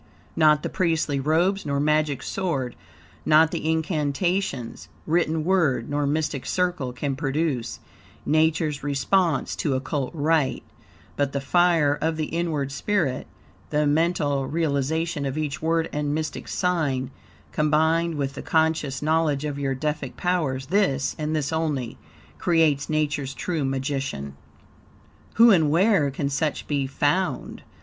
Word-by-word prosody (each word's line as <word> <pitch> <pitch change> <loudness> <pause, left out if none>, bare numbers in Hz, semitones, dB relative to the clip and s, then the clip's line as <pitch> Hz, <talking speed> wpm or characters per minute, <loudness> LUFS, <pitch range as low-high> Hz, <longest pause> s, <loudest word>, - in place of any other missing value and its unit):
Not 150 -2 +4
the - - -2
priestly 160 -5 0
robes 170 +8 +1
nor 140 -1 -1
magic 150 -2 +1
sword, 145 -11 -2 0.5
not 155 +1 +5
the 160 - -2
incantations, 160 -3 -1 0.2
WRITTEN 160 -1 +1
WORD, 150 -10 +1
nor 145 0 0
mystic 150 -2 -1
circle, 180 -8 -1
can 135 +2 -3
produce 140 -3 -2 0.5
Nature's 155 0 +1
response 145 +3 +1
to 140 -4 0
Occult 135 0 -2
rite; 155 -2 +1 0.5
but 140 -1 -1
the 140 - 0
fire 160 -1 +3
of 160 0 0
the 155 - -1
inward 155 -4 -2
spirit, 140 -2 -1 0.4
the 150 0 +1
mental 145 -3 +1
realization 160 +1 -1
of 135 +1 -3
each 150 -3 -3
word 165 +1 +1
and 150 0 -1
mystic 155 0 -4
sign, 145 -8 -1 0.4
combined 160 +2 +2
with 140 -2 -2
the - - -7
conscious 160 -4 0
knowledge 155 -2 +1
of 145 -1 -3
your 135 -1 -1
own - - -6
Deific 150 -3 -3
powers 155 -8 -1
this, 165 -10 +1
and 155 +1 -1
this 150 0 -1
only, 145 -7 -2 0.4
creates 155 -5 +2
Nature's 150 -3 -1
true 165 -5 -2
magician. 135 - -3 1.0
Who 230 +1 +7
and 160 -6 +4
where 170 -2 +3
can 140 +1 -2
such 150 +2 -1
be 140 -2 -1
found? 145 +2 -1
150 Hz, 135 wpm, -24 LUFS, 140-165 Hz, 1.0 s, Who